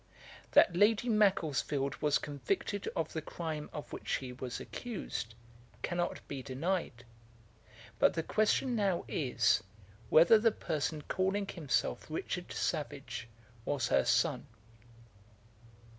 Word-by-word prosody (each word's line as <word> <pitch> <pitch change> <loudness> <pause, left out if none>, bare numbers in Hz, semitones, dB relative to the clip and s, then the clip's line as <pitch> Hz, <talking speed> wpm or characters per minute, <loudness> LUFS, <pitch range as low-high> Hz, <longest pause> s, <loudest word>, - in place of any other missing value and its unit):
] - - -19
That 175 - +6
Lady 210 +5 +4
Macclesfield 155 - +2
was 150 -1 +2
convicted 200 - -2
of 160 -2 -2
the 160 - -2
crime 155 -1 -5
of 150 - -7
which - - -7
she 130 -2 -2
was 125 0 -5
accused, 190 - -5 0.5
cannot 175 0 -2
be 140 -2 -5
denied; 135 -2 -2 0.9
but - - +4
the 165 - 0
question 220 +6 +2
now 195 -5 +1
is, 115 - +2 0.5
whether 170 +8 +7
the 225 +1 +4
person 155 -5 -2
calling 190 +4 0
himself 150 -10 -1
Richard - - -4
Savage 120 0 -3 0.4
was 125 -2 -1
her - - +4
son. 125 +3 +1
155 Hz, 120 wpm, -33 LUFS, 130-195 Hz, 0.9 s, whether